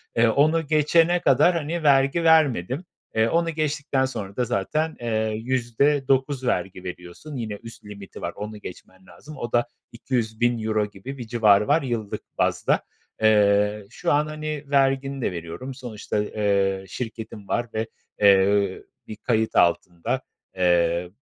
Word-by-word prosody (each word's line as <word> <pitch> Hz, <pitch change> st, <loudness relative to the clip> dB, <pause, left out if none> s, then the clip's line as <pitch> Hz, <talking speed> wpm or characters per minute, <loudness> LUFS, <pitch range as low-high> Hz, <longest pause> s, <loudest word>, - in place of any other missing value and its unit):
Eee, 115 Hz, +1 st, +4 dB
onu 155 Hz, +6 st, +2 dB
geçene 165 Hz, +3 st, +3 dB
kadar, 150 Hz, +7 st, +4 dB
hani, 165 Hz, +1 st, -3 dB
vergi 140 Hz, +3 st, +3 dB
vermedim. 150 Hz, -, +3 dB, 0.3 s
Eee, 110 Hz, 0 st, +3 dB
onu 170 Hz, +3 st, +1 dB
geçtikten 150 Hz, -3 st, -1 dB
sonra 105 Hz, -7 st, -6 dB
da 125 Hz, -, 0 dB
zaten, 155 Hz, +12 st, -1 dB
eee, 110 Hz, -2 st, -1 dB
%9 130 Hz, +2 st, +1 dB
vergi 95 Hz, -5 st, -2 dB
veriyorsun. 90 Hz, -, -8 dB
Yine 115 Hz, -4 st, -4 dB
üst 115 Hz, -2 st, -12 dB
limiti 100 Hz, -2 st, -10 dB
var, -, -, -4 dB
onu 105 Hz, +1 st, -6 dB
geçmen 95 Hz, +1 st, -11 dB
lazım. 150 Hz, +10 st, -13 dB
O 120 Hz, -, -5 dB
da 120 Hz, 0 st, +2 dB, 0.2 s
€200.000 115 Hz, -3 st, -1 dB
gibi 105 Hz, +7 st, -9 dB
bir 120 Hz, -3 st, -7 dB
civarı 105 Hz, -3 st, +4 dB
var 150 Hz, +3 st, +3 dB
yıllık 115 Hz, -6 st, -3 dB, 0.2 s
bazda. -, -, +1 dB, 0.4 s
Eee, 105 Hz, -1 st, +3 dB
şu 115 Hz, -, -2 dB
an, 150 Hz, +1 st, +2 dB
hani, 155 Hz, -1 st, -5 dB
vergini 135 Hz, -1 st, +1 dB
de -, -, 0 dB
veriyorum. 85 Hz, +10 st, -6 dB
Sonuçta, 110 Hz, -4 st, -4 dB
eee, 100 Hz, -2 st, 0 dB
şirketim 110 Hz, -1 st, -7 dB
var 120 Hz, 0 st, -1 dB
ve, 110 Hz, 0 st, -2 dB, 0.3 s
eee, 100 Hz, -1 st, +4 dB, 0.2 s
bir 110 Hz, -, -7 dB
kayıt 110 Hz, 0 st, -1 dB
altında. 85 Hz, 0 st, +1 dB, 0.3 s
Eee, 85 Hz, -1 st, +2 dB
115 Hz, 140 wpm, -24 LUFS, 105-140 Hz, 0.4 s, Eee